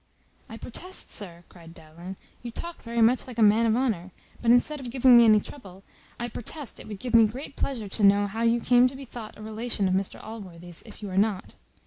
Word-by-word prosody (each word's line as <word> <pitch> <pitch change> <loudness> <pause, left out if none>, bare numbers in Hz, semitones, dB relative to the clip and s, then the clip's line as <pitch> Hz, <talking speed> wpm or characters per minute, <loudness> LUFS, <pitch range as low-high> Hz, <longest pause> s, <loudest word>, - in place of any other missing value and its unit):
"I 225 - -8
protest, 365 +12 -6
sir," 175 -5 -4
cried 165 -2 -15
Dowling, 170 +4 -10 0.3
"you 240 - -6
talk 340 +8 -7
very 235 -1 0
much 245 +4 +3
like 245 -2 -9
a 225 - +4
man 215 +2 +5
of 220 - +2
honour; 220 -8 -1 0.3
but 235 - 0
instead 245 +5 +4
of 255 -3 -7
giving 255 0 +5
me 235 0 +8
any 215 -1 +6
trouble, 195 -6 -12 0.4
I 240 - -2
protest 250 +4 -7
it - - -11
would 210 -2 -7
give 245 +4 -6
me 225 -1 +7
great 260 +6 -8
pleasure 235 -7 -3
to 205 +2 -1
know 200 +1 +5
how 210 +3 -5
you 230 0 +2
came 245 +1 +5
to 260 - -7
be 270 0 -9
thought 230 -3 -10
a 215 - -10
relation 220 -1 -2
of 185 - 0
Mr 190 +1 -2
Allworthy's, 180 -6 -9
if 215 0 -13
you 200 - -5
are 185 - +1
not. 205 -2 -1
225 Hz, 235 wpm, -26 LUFS, 195-245 Hz, 0.4 s, me